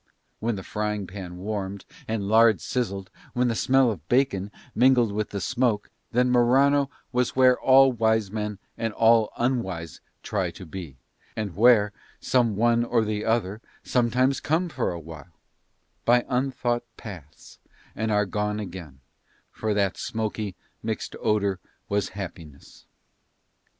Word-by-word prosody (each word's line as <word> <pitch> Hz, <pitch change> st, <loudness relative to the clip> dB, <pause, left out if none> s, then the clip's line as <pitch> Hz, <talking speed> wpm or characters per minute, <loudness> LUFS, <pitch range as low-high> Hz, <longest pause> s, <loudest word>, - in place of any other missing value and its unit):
When 115 Hz, 0 st, -1 dB
the 95 Hz, -, -6 dB
frying 105 Hz, -1 st, -2 dB
pan 90 Hz, -2 st, -8 dB
warmed 100 Hz, 0 st, -4 dB, 0.2 s
and 110 Hz, -3 st, -2 dB
lard 110 Hz, 0 st, +5 dB
sizzled, 100 Hz, -7 st, -3 dB, 0.2 s
when 125 Hz, 0 st, +2 dB
the -, -, +1 dB
smell 130 Hz, -1 st, +3 dB
of 85 Hz, -7 st, -8 dB
bacon 120 Hz, -7 st, +2 dB, 0.2 s
mingled 125 Hz, -2 st, +4 dB
with 105 Hz, +1 st, -2 dB
the 100 Hz, -, -4 dB
smoke, 120 Hz, -3 st, 0 dB, 0.2 s
then 125 Hz, +1 st, +2 dB
Morano 135 Hz, +3 st, +4 dB, 0.2 s
was 125 Hz, -1 st, 0 dB
where 130 Hz, -1 st, +5 dB
all 135 Hz, 0 st, +6 dB
wise 110 Hz, -3 st, +1 dB
men 105 Hz, -1 st, -3 dB, 0.2 s
and 115 Hz, -1 st, -1 dB
all 115 Hz, -1 st, +4 dB
unwise 95 Hz, -, -2 dB, 0.2 s
try -, -, -1 dB
to -, -, -10 dB
be, 80 Hz, -5 st, -8 dB, 0.4 s
and 105 Hz, -6 st, -4 dB
where 105 Hz, -1 st, +5 dB, 0.3 s
some 125 Hz, -3 st, +2 dB
of -, -, -5 dB
one 120 Hz, +2 st, +3 dB
or 115 Hz, -2 st, +1 dB
the 105 Hz, 0 st, -2 dB
other 110 Hz, -2 st, 0 dB, 0.2 s
some 120 Hz, -2 st, +1 dB
times 130 Hz, +3 st, +2 dB
come 170 Hz, +4 st, 0 dB
for 130 Hz, -, -1 dB
awhile, 80 Hz, -1 st, -10 dB, 0.7 s
by 120 Hz, +1 st, +4 dB
unthought 125 Hz, -2 st, 0 dB, 0.2 s
paths 85 Hz, -10 st, -11 dB, 0.4 s
and 110 Hz, 0 st, -1 dB
are 105 Hz, 0 st, +3 dB
gone 105 Hz, +2 st, -2 dB
again; 85 Hz, -9 st, -8 dB, 0.5 s
for 110 Hz, -1 st, -2 dB
that 100 Hz, -2 st, +1 dB
smoky, 110 Hz, -3 st, -3 dB, 0.3 s
mixed 110 Hz, -1 st, -4 dB
odour 100 Hz, -3 st, +1 dB, 0.3 s
was 100 Hz, -1 st, 0 dB
happiness. 85 Hz, -7 st, -9 dB
110 Hz, 145 wpm, -25 LUFS, 100-120 Hz, 0.7 s, all